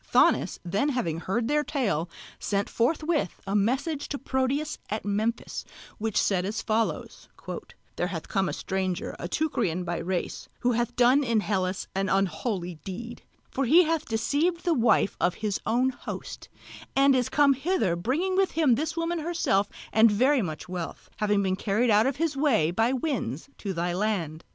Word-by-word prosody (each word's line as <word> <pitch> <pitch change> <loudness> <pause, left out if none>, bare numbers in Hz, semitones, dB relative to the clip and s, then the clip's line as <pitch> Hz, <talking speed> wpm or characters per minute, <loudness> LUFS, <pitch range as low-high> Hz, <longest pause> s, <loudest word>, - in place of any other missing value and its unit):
Thonis - - +4
then 200 +11 +1
having 200 - -1
heard 225 +7 -1
their 295 +2 +2
tale 200 - -1 0.3
sent 200 -1 -1
forthwith 305 - 0
a 195 +1 -2
message 270 +8 0
to 285 - -3
Proteus 270 +3 -1
at 215 0 -3
Memphis, 215 +3 -1 0.4
which 220 -1 -1
said 185 -3 +1
as 210 +4 -2
follows: 225 0 -2 0.7
"There 175 - 0
hath 170 -4 -5
come 195 -1 0
a - - -3
stranger, 190 -2 -2
a - - -4
Teucrian 190 - 0
by 175 -1 -2
race, 180 +1 -3
who 245 - +3
hath 240 0 -1
done 250 +4 +5
in 230 -4 +2
Hellas 190 -2 -1
an 195 0 0
unholy 190 -3 -1
deed; 235 +5 -7 0.3
for 275 - 0
he 325 +9 +7
hath 320 -1 0
deceived 290 +10 0
the 345 - +3
wife 230 -6 +3
of 175 - +2
his 210 -2 -2
own 255 +3 +2
host, 245 - -8 0.5
and 275 0 +5
is 250 -2 +1
come 285 0 +5
hither 270 - 0
bringing 290 - 0
with 385 0 +2
him 310 -6 +4
this 315 +6 -1
woman 335 +1 -1
herself 305 - +1 0.2
and 220 +1 +7
very 255 +6 +3
much 160 -6 -5
wealth, 180 -2 -6
having 205 -1 +2
been 190 -1 +1
carried 215 +4 +1
out 215 +3 +5
of 270 - 0
his 320 -1 -1
way 245 - +2
by 225 +7 +2
winds 260 - -2
to 200 - -3
thy 175 0 -1
land. 175 -5 -2
225 Hz, 175 wpm, -27 LUFS, 190-280 Hz, 0.7 s, he